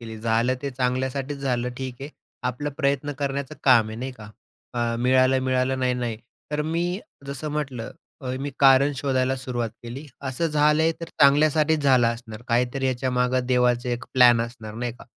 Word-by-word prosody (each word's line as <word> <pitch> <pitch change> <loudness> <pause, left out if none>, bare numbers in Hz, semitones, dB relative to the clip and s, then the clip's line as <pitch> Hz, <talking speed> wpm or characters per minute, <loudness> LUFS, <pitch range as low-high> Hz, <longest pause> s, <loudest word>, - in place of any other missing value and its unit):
केली. 110 -1 -8
झालं 115 +3 +1
ते 140 - -2
चांगल्यासाठीच 130 +2 -2
झालं 125 -3 -1
ठीक 130 -1 -4
आहे. 140 - -6 0.4
आपला 145 +4 -3
प्रयत्न 140 +1 0
करण्याचं 140 +1 -3
काम 120 -5 +5
आहे, 110 - -7
नाही 130 +1 -4
का? 105 -3 -12 0.4
अ, 120 -1 0
मिळालंय-मिळालं 130 +1 +2
नाही-नाही. 125 -3 -1 0.4
तर 150 0 0
मी 175 +4 -1 0.3
जसं 140 +2 -5
म्हटलं 135 -6 -4 0.3
अ, 125 - -3
मी 145 - -3
कारण 135 +1 +6
शोधायला 130 -1 0
सुरुवात 120 -3 -3
केली. 130 +6 -8 0.2
असं 130 +6 -1
झालंय 150 +1 +3
तर 165 - -5
चांगल्यासाठीच 150 +2 +4
झालं 130 -4 +4
असणार. 115 -1 -10
काहीतरी 125 +3 +1
याच्यामागं 125 0 0
देवाचे 125 -1 +2
एक 120 - -4
प्लॅन 120 -2 +6
असणार, 110 -2 -8
नाही 120 0 -3
का? - - -12
130 Hz, 160 wpm, -24 LUFS, 120-140 Hz, 0.4 s, कारण